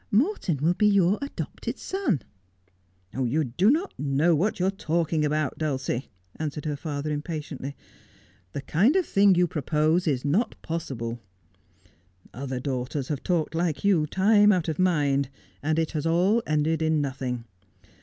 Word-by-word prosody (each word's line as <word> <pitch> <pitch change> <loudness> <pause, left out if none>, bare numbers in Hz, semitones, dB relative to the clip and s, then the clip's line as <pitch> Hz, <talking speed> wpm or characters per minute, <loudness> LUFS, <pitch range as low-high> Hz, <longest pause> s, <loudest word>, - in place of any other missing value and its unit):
Morton 225 - +1
will 160 +6 +2
be 210 +3 +3
your 200 -1 +3
adopted 280 - -5
son.' 290 - -1 0.9
'You 130 +4 0
do 150 - +2
not 330 +9 +1
know 145 +4 +2
what 185 +8 0
you 180 - +2
are 190 - +2
talking 165 -5 0
about, 150 -1 -1
Dulcie,' 135 -4 -2 0.3
answered 150 -1 -4
her 150 -1 -1
father 145 0 -4
impatiently. 150 -2 -5 0.4
' 90 0 -32
The 140 - -3
kind 210 - +3
of 375 -2 +3
thing 200 -5 +4
you 180 +1 +4
propose 155 +2 +1
is 135 -3 0
not 200 +11 0
possible. 120 -8 -4 1.1
Other 130 0 -4
daughters 130 +1 -3
have 145 -3 -2
talked 170 -4 0
like 165 -2 -1
you, 170 -7 +3
time 205 +4 +5
out 180 -4 +1
of 160 0 -2
mind, 145 -7 +2 0.3
and 155 +2 0
it 160 -1 0
has 155 -1 -2
all 185 +8 +3
ended 155 +2 +1
in 160 -1 +2
nothing. 130 -4 -3
155 Hz, 155 wpm, -26 LUFS, 140-185 Hz, 1.1 s, time